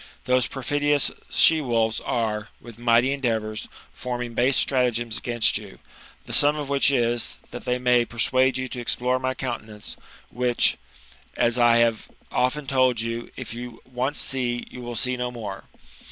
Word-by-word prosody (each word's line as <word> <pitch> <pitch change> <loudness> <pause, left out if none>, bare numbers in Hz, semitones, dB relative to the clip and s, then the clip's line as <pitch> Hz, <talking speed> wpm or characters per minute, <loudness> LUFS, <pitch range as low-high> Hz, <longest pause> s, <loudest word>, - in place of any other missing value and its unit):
Those 125 -1 +2
perfidious 145 +2 +1 0.2
she 160 -1 +5
wolves 115 -4 +1
are, 110 -3 -2
with 115 -1 -13
mighty 120 +2 +4
endeavours, 110 -5 -2 0.3
forming 125 -1 -4
base 125 +4 +3
stratagems 120 -4 +1
against 120 -3 +1
you, 100 -3 -12 0.5
the - - -6
sum 145 +1 +4
of 145 -2 -4
which 140 -1 +3
is, 120 -3 0
that - - -8
they 125 0 +1
may 125 -1 +3
persuade 130 +2 +1
you 130 0 -3
to 125 - -5
explore 125 +2 0
my 130 0 -2
countenance, 110 -5 -6 0.3
which, 125 0 +2 0.6
as 120 +1 +2
I 120 -1 +6
have 115 -2 +2 0.2
often 140 +4 0
told 130 -3 +2
you, 115 +1 -3
if 130 -3 -7
you 120 0 -7
see 130 - -25
once, 130 +3 0
you 125 -1 -3
will 120 -1 -6
see 125 +3 0
no 125 0 -2
more. 105 -5 -7
125 Hz, 160 wpm, -24 LUFS, 115-130 Hz, 0.6 s, I